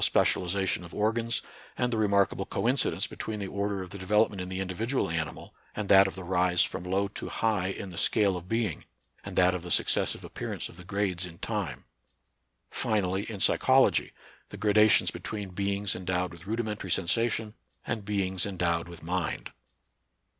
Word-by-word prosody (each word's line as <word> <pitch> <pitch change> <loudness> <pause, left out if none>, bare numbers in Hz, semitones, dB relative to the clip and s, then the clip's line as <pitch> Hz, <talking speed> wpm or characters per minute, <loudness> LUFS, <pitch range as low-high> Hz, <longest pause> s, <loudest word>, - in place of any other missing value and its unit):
specialization 95 0 +2
of 85 - -10
organs, 115 +2 0 0.3
and 125 0 0
the - - 0
remarkable 100 -2 +2
co 110 - -2
incidence 130 +1 +2
between 110 -1 -5
the 100 - -3
order 100 0 -2
of 90 - -11
the 100 - -7
development 105 +1 +2
in 90 - -5
the 95 0 -4
individual 95 +4 -1
animal 80 -1 -4 0.2
and 105 -2 -3
that 95 0 +8
of 95 - -6
the 95 - -7
rise 90 -1 +3
from - - -3
low 95 +2 0
to 100 - -7
high 105 -5 0
in 95 0 -5
the 85 - -5
scale 100 -4 +3
of 90 +1 -7
being, 115 -6 -1 0.4
and - - -7
that 90 0 +5
of 90 - -3
the 90 - -8
successive - - +2
appearance - - -5
of - - -14
the 90 - -11
grades 95 -2 -1
in 85 -1 -12
time; - - -3 0.9
finally 100 -1 0
in 105 -3 -6
psychology, - - +4 0.4
the - - -9
gradations 105 0 +4
be - - -8
tween 105 -3 -5
beings 100 +1 -1
endowed 90 -1 -1
with 85 +2 -13
rudimentary 110 -3 -3
sensar 95 +7 +2
tion 110 -1 -3 0.3
and 110 -3 -3
beings 95 -3 0
endowed 85 -4 0
with 85 -2 -11
mind. 90 0 -2
95 Hz, 180 wpm, -29 LUFS, 90-105 Hz, 0.9 s, that